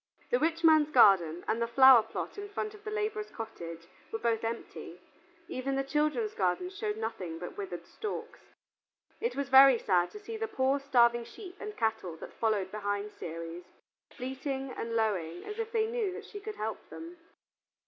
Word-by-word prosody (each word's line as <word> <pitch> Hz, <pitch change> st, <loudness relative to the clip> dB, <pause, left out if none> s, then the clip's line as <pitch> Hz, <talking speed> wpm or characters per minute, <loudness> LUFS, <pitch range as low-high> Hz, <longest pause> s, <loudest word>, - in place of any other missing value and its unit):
The 245 Hz, -, +3 dB
rich 330 Hz, +3 st, 0 dB
man's 310 Hz, -2 st, +6 dB
garden 185 Hz, -, +5 dB
and 225 Hz, -, 0 dB
the 235 Hz, -, +1 dB
flower 260 Hz, 0 st, +8 dB
plot -, -, -6 dB
in 405 Hz, 0 st, -6 dB
front 425 Hz, +1 st, -4 dB
of 425 Hz, -1 st, -14 dB
the 430 Hz, -, -5 dB
laborer's 425 Hz, 0 st, -2 dB
cottage 170 Hz, -8 st, -7 dB, 0.3 s
were -, -, -2 dB
both 230 Hz, -1 st, 0 dB
empty; 230 Hz, +1 st, -5 dB, 0.5 s
even 270 Hz, -1 st, -2 dB
the 270 Hz, -, 0 dB
children's 275 Hz, -5 st, 0 dB
gardens 205 Hz, -, -1 dB
showed 420 Hz, +1 st, -2 dB
nothing 185 Hz, -, -4 dB
but 175 Hz, +1 st, -7 dB
withered 175 Hz, -4 st, -6 dB
stalks. 425 Hz, -1 st, -6 dB, 0.8 s
It 470 Hz, -, -2 dB
was 280 Hz, -1 st, -2 dB
very 265 Hz, -1 st, +9 dB
sad 180 Hz, -5 st, +2 dB
to 420 Hz, -, -10 dB
see 445 Hz, +2 st, -7 dB
the 450 Hz, 0 st, -2 dB
poor 270 Hz, -8 st, +1 dB
starving 240 Hz, -4 st, +3 dB
sheep 365 Hz, -, -11 dB
and 425 Hz, 0 st, -7 dB
cattle 220 Hz, -7 st, -1 dB
that -, -, -10 dB
followed 210 Hz, -4 st, 0 dB
behind 205 Hz, 0 st, -3 dB
Ceres, 165 Hz, 0 st, -7 dB, 0.5 s
bleating 265 Hz, +1 st, -4 dB
and 230 Hz, -2 st, -4 dB
lowing 185 Hz, -7 st, -1 dB
as 420 Hz, +1 st, -6 dB
if 455 Hz, 0 st, -3 dB
they 445 Hz, -1 st, +2 dB
knew 450 Hz, -3 st, -1 dB
that 415 Hz, +2 st, -8 dB
she 410 Hz, -, -8 dB
could 425 Hz, +1 st, -7 dB
help 220 Hz, +1 st, -5 dB
them. 335 Hz, +2 st, -9 dB
260 Hz, 180 wpm, -30 LUFS, -, 0.8 s, very